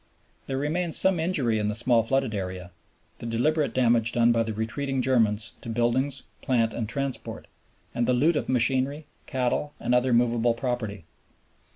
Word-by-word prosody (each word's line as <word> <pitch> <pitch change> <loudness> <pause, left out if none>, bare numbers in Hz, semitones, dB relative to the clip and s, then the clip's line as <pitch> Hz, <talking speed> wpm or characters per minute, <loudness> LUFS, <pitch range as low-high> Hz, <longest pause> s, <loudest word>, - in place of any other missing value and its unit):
There 135 - -2
remains 160 +4 -1
some 190 -3 +2
injury 145 -10 +1
in 105 - -1
the 105 - -1
small 120 +1 +3
flooded 135 0 0
area, 90 -3 -5 0.5
the 115 - -6
deliberate 145 +6 +1
damage 120 -2 +2
done 120 0 +4
by 115 -1 +2
the 115 -1 -2
retreating 130 +6 -3
Germans 115 -5 +2
to - - -8
buildings, 120 +4 0 0.2
plant, 115 -3 +1
and 110 -2 -3
transport, 140 0 -3 0.5
and 120 0 0
the 125 - +3
loot 150 +7 +3
of - - -2
machinery, 130 +4 +1 0.2
cattle, 130 +2 -1
and 120 - -1
other 125 +1 +3
movable 120 -1 +2
property. 115 - -3
120 Hz, 165 wpm, -26 LUFS, 115-135 Hz, 0.5 s, done